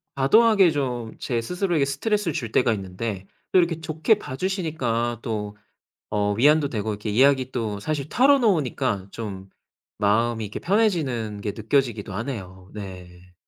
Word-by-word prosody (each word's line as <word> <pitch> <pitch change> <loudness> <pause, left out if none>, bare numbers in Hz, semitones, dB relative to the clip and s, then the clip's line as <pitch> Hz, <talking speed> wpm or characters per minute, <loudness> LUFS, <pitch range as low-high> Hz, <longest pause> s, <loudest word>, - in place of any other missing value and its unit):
과도하게 195 +7 +5
좀 125 -6 -3
제 120 -2 -1
스스로에게 175 - 0
스트레스를 175 +6 -1
줄 115 -5 -4
때가 120 -1 +3
있는데 95 0 -5 0.3
또 185 - +6
이렇게 170 -2 0
좋게 160 +7 +2
봐 130 - -7
주시니까 135 - -1
또 105 -3 -4 0.6
어 105 0 +1
위안도 145 +7 +4
되고 110 -4 -3
이렇게 105 +1 -4
이야기 130 +3 +3
또 110 -5 -2
사실 145 +5 -3
털어놓으니까 165 - +2
좀 100 -4 -7 0.5
마음이 110 +2 +1
이렇게 105 0 -5
편해지는 155 - 0
게 100 0 -3
느껴지기도 115 -3 0
하네요. 95 -5 -6
네. 90 -3 -10
120 Hz, 340 characters per minute, -24 LUFS, 105-155 Hz, 0.6 s, 또